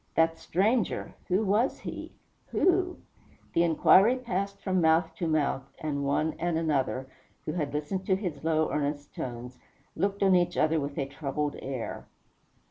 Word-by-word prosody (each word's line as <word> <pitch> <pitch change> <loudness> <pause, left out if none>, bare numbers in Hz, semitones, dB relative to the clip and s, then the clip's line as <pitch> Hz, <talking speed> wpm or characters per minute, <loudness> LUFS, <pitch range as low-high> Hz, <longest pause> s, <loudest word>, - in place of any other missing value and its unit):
That 165 0 +3
stranger 210 +5 0
who 190 +4 +2
was 210 +6 +2
he? - - -6 0.4
Who? 360 0 +2 0.6
The 170 - +3
inquiry 185 +7 +5
passed 200 -5 -3
from 185 -2 0
mouth 160 +2 +3
to 170 - -1
mouth, 155 -4 +1 0.2
and 145 -2 -2
one 150 +3 +1
and 175 -2 0
another, 140 -5 0 0.4
who - - -2
had 150 -5 -2
listened 150 +6 -3
to 190 - +4
his 180 -7 -4
low, 160 -1 +1
earnest 145 0 -2
tones, 125 0 -6 0.4
looked 200 +3 0
on 190 -1 +5
each 175 -1 +2
other 160 +1 +3
with 140 0 -4
a 140 - 0
troubled 145 +1 -3
air. 130 -3 -5
165 Hz, 155 wpm, -28 LUFS, 145-190 Hz, 0.6 s, inquiry